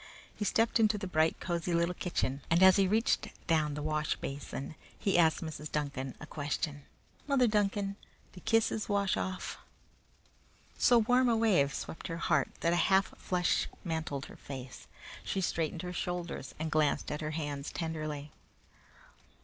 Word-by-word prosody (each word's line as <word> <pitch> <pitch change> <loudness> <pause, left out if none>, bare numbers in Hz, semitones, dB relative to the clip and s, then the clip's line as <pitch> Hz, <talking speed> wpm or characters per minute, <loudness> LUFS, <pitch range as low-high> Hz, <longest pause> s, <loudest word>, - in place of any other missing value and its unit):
He 210 - -3
stepped 225 +3 +2
into 215 -1 +4
the 200 - -4
bright, 160 -3 +2
cosy 170 -1 -1
little 170 +1 +2
kitchen, 140 -6 -2
and 170 +3 +5
as 190 0 +8
he 195 -1 +4
reached 220 +4 +2 0.2
down 155 -3 +2
the 150 - -4
wash 155 0 0
basin 140 +1 -5 0.2
he 195 - 0
asked 160 -2 +4
Mrs. 155 -2 -6
Duncan 140 -3 -3
a - - -7
question. 145 -1 -3 0.4
"Mother 275 -3 +4
Duncan, 205 -2 +1 0.4
do 185 - -10
kisses 225 -1 +1
wash 200 -2 +2
off?" 185 -1 -4 1.2
So 245 - +5
warm 245 +3 +4
a 230 - +3
wave 190 -11 +3
swept 160 - -6
her 165 - -4
heart - - +2
that 170 - +3
a 175 - +3
half 190 0 +3
flush 180 -1 +1 0.2
mantled 160 -5 -3
her - - -12
face. 130 -2 -8 0.4
She - - -2
straightened 165 -2 -1
her 180 0 -4
shoulders 175 -6 -4
and 160 0 -3
glanced 155 -2 +1
at 150 - -3
her 155 - -2
hands 145 -2 -4
tenderly. 155 -3 -4
170 Hz, 160 wpm, -32 LUFS, 150-195 Hz, 1.2 s, as